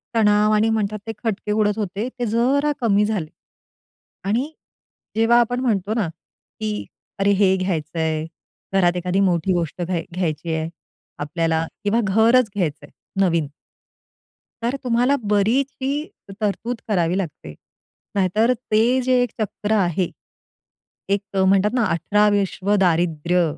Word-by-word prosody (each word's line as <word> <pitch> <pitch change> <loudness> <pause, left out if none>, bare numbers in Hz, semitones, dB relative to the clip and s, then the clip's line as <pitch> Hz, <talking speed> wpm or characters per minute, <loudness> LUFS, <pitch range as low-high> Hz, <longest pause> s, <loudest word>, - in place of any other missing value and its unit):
तणाव 210 -1 +4
आणि 215 +1 +3
म्हणतात 215 -1 -1
ते - - -1
खटके 210 -2 -2
उडत 210 0 +1
होते 205 +2 -2
ते 245 - 0
जरा 260 +7 +2
कमी 210 -3 +3
झाले. 205 -7 -2 1.0
आणि 235 +10 0 0.6
जेव्हा 225 +2 +5
आपण 245 +1 +1
म्हणतो 215 -5 0
ना, 220 -5 0 0.5
की 215 -1 -3 0.3
अरे 200 +1 +3
हे 190 -1 +4
घ्यायचंय, 160 -3 -1 0.5
घरात 180 -2 +3
एखादी 180 +2 0
मोठी 185 -2 +2
गोष्ट 170 -1 -2
घ - - 0 0.3
घ्यायची 165 -2 -2
आहे 160 0 -2 0.5
आपल्याला 160 +2 0 0.2
किंवा 210 +3 +2
घरच 225 +4 +4
घ्यायचंय 170 -7 -2 0.3
नवीन 170 -5 +2 1.2
तर 240 +3 0
तुम्हाला 250 +2 +2 0.2
बरीचशी 260 +6 +1 0.5
तरतूद 215 +3 -2
करावी 180 -4 +1
लागते. 155 - -5 0.6
नाहीतर 210 +5 +3
ते 220 -3 -1 0.2
जे 255 +1 +1
एक 245 - -3
चक्र 210 0 -3
आहे, 185 -3 +1 1.0
एक 200 0 +2
अ, 190 -1 +2
म्हणतात 195 +2 +3
ना 250 -2 +2
अठरा 205 +5 +2
विश्व 200 0 +1
दारिद्र्य 175 -1 +2
200 Hz, 130 wpm, -22 LUFS, 180-225 Hz, 1.2 s, जेव्हा